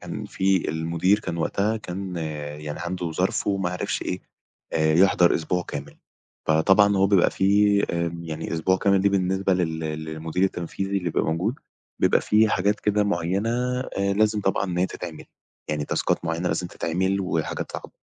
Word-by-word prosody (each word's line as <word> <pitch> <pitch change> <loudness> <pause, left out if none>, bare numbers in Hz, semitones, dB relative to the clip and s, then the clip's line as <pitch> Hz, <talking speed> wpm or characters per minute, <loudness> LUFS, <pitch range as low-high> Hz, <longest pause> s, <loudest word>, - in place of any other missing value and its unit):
كان - - -6
في 95 -1 +1
المدير 85 +5 +1
كان 85 - -4
وقتها 100 +6 0
كان 95 -3 -6 0.4
يعني 75 -1 -5
عنده 85 -1 -3
ظرف - - 0
وما 95 -3 0
عرفش 90 - -2
إيه، 90 - -3 0.5
آآ 80 -1 +2
يحضر 90 0 +5
أسبوع 90 +2 -1
كامل، 75 -3 -7 0.5
فطبعًا 95 +6 +4
هو 95 0 +4
بيبقى 95 -3 +4
في 100 +1 +3
آآ 85 -1 -1
يعني 80 0 -5
أسبوع 95 +3 +2
كامل 95 0 +2
ليه 100 - +3
بالنسبة 95 0 +1
لل 80 -3 -1
للمدير 80 +2 -3
التنفيذي 95 +2 -2
اللي 90 -2 -1
يبقى - - 0
موجود، 90 +10 0 0.5
بيبقى - - +4
في 110 +1 +3
حاجات 100 +2 +1
كده 105 0 +2
معيّنة 95 +3 0 0.3
آآ 100 -6 -1
لازم 105 0 +2
طبعًا 95 0 0
أن 90 -2 -3
هى 90 - +3
تتعمل. 85 -4 -8 0.5
يعني 75 -1 -1
تاسكات - - -1
معيّنة 85 +2 -1
لازم 90 - -1
تتعمل 95 +4 -1
وحاجات 85 -4 -2
صعبة. - - -7
90 Hz, 165 wpm, -24 LUFS, 85-100 Hz, 0.5 s, يحضر